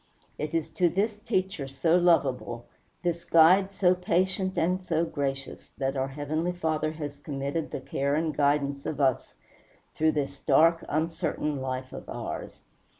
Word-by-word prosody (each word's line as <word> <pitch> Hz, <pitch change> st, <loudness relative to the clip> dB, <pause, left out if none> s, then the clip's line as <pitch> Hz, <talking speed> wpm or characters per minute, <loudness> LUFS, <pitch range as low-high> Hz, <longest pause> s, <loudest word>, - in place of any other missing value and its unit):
It 150 Hz, +2 st, -3 dB
is 165 Hz, -, -1 dB
to 180 Hz, -2 st, +2 dB
this 205 Hz, +4 st, -1 dB
Teacher 190 Hz, -, -1 dB
so 160 Hz, +5 st, +1 dB
lovable, 140 Hz, -9 st, +2 dB, 0.4 s
this 170 Hz, -1 st, -1 dB
Guide 185 Hz, +4 st, +5 dB
so 185 Hz, -2 st, +3 dB
patient 185 Hz, +1 st, 0 dB
and 180 Hz, +3 st, +1 dB
so 165 Hz, -2 st, +1 dB
gracious, 135 Hz, -3 st, -4 dB
that 135 Hz, 0 st, -1 dB
our 135 Hz, 0 st, 0 dB
Heavenly 155 Hz, +5 st, -2 dB
Father 155 Hz, -3 st, -1 dB
has 145 Hz, -2 st, -6 dB
committed 145 Hz, +2 st, -3 dB
the -, -, -5 dB
care 140 Hz, +2 st, -1 dB
and 155 Hz, 0 st, -1 dB
guidance 140 Hz, -1 st, +1 dB
of 145 Hz, -, -3 dB
us 135 Hz, -3 st, +1 dB, 0.6 s
through 155 Hz, 0 st, +2 dB
this 140 Hz, -2 st, -2 dB
dark, 165 Hz, +3 st, +4 dB
uncertain 155 Hz, -1 st, -1 dB
life 130 Hz, 0 st, -4 dB
of -, -, -9 dB
ours. -, -, -6 dB
155 Hz, 150 wpm, -28 LUFS, 140-175 Hz, 0.6 s, Guide